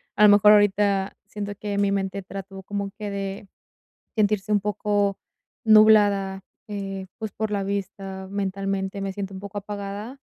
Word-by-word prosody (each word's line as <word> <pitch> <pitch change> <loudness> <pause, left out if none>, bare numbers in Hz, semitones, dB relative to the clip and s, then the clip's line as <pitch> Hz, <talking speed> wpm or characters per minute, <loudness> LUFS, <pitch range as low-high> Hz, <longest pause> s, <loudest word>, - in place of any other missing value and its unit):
A 210 - +4
lo 210 - +9
mejor, 205 0 +7
ahorita 200 -1 +3
siento 205 0 -5
que 205 0 -4
mi 200 0 +2
mente 195 0 -2
trató 195 0 -8
como 200 0 -4
que 210 -1 -4
de 195 0 -5 0.7
sentirse 210 -1 +1
un 205 - +4
poco 205 0 0 0.5
nublada, 205 -3 +5 0.2
eh, 195 -2 -5
pues, 220 -1 -5
por 220 0 -3
la 200 -1 -1
vista. 195 -1 -4
Mentalmente, 195 0 -2
me 195 0 -3
siento 195 0 -5
un 190 - -7
poco 200 +1 -6
apagada 205 +5 -6
200 Hz, 155 wpm, -24 LUFS, 195-205 Hz, 0.7 s, lo